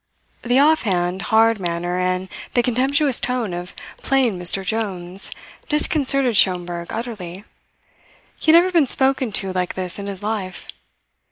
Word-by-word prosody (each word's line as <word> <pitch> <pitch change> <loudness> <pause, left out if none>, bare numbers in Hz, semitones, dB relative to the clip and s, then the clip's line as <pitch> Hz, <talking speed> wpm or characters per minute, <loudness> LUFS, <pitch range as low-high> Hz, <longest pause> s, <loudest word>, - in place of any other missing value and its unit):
The 245 +1 +1
offhand, 195 - +2
hard 225 -1 +3
manner 175 0 -3
and 185 +1 -1 0.3
the 245 - +3
contemptuous 265 +3 +1
tone 245 -6 -2
of 175 +1 -7 0.2
"plain 255 -8 0
Mr. 185 +2 +4
Jones" 190 -3 -3 0.4
disconcerted 275 -5 +2
Schomberg 175 -3 +1
utterly. 205 -6 -6 1.0
He 315 - +3
had 330 - +8
never 360 +2 +3
been 330 -6 +3
spoken 265 -2 +2
to 195 -1 0
like 180 -1 -2
this 185 0 -4
in 200 - -6
his 200 -1 -7
life. 205 -3 -4
205 Hz, 140 wpm, -20 LUFS, 180-255 Hz, 1.0 s, had